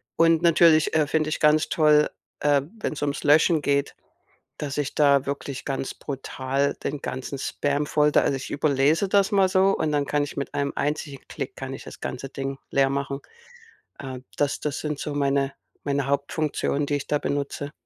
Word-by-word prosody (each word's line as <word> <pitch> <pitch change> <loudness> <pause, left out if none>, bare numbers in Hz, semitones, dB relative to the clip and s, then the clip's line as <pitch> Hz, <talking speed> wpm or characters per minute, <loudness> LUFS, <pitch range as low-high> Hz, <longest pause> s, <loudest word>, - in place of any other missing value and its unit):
Und 165 -1 +4
natürlich, 165 -2 +5
äh, 155 -1 +4
finde 155 +1 0
ich 155 - -2
ganz 150 0 +3
toll, 150 -1 +4 0.3
äh, 145 -1 +3 0.2
wenn's 155 - -3
ums 145 -1 -2
Löschen 155 +2 +4
geht, 140 0 0 0.6
dass 145 -1 -4
ich 145 -2 -2
da 140 -2 +4
wirklich 140 -1 -4
ganz 135 -1 -3
brutal 135 0 -2
den 145 0 -3
ganzen 130 +1 -5
Spam 145 +2 -1
voll 150 0 +2
da - - +5
also, 140 - +1
ich 135 - -7
überlese 150 +5 +2
das 200 +1 +3
mal 195 -2 +4
so 190 +1 +3
und 155 - 0
dann 145 -1 +1
kann 145 0 +1
ich 145 - -8
mit 140 - -4
einem 140 0 -1
einzigen 145 -2 -3
Klick - - -6
kann 130 0 -6
ich - - -9
das - - -11
ganze 130 +1 -5
Ding 135 0 -5
leer 135 -1 +3
machen. 140 0 -2 0.8
Äh, 130 -2 -6 0.2
das 145 -1 0
das 150 -2 -3
sind 150 -2 -3
so 150 - -4
meine 140 -1 +1 0.3
meine 140 -2 0
Hauptfunktionen, 140 +1 -1
die 145 - 0
ich 140 - -5
da 150 - +1
benutze. 145 0 -3
145 Hz, 190 wpm, -25 LUFS, 140-150 Hz, 0.8 s, natürlich